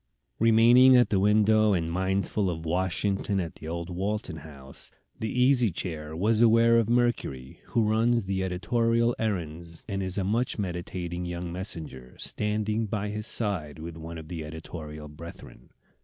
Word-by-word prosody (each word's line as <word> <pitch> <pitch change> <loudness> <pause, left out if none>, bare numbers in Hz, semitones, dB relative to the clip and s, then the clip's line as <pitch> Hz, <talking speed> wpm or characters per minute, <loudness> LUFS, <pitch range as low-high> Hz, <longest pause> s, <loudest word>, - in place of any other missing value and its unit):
Remaining 120 +3 +7
at 120 - +4
the 100 - +3
window, 105 +1 +4
and 85 -3 -1
mindful 95 +2 0
of 80 -2 -5
Washington 95 +3 0
at 85 -3 -3
the 80 - -9
old 85 +2 -4
Walton 95 -2 -3
House, 70 -3 -10 0.3
the 110 - -2
Easy 125 -2 +3
Chair 80 -3 -5
was 110 +6 +2
aware 115 0 +5
of 115 -1 0
Mercury, 120 - -1
who 115 -2 +1
runs 115 +2 +2
the 95 0 -2
editorial 115 +6 +1
errands 85 -6 -4
and 100 -3 -3
is 95 0 -4
a 100 - 0
much 115 +6 0
meditating 90 -2 -4
young 85 0 -5
messenger, 80 -9 -5
standing 105 +1 -1
by 105 -1 -2
his 105 +1 -4
side 90 -10 -1
with 80 +1 -7
one 80 +1 -8
of 80 -1 -9
the 80 -1 -5
editorial 75 -1 -8
brethren. 80 +3 -12
95 Hz, 155 wpm, -27 LUFS, 85-110 Hz, 0.3 s, Remaining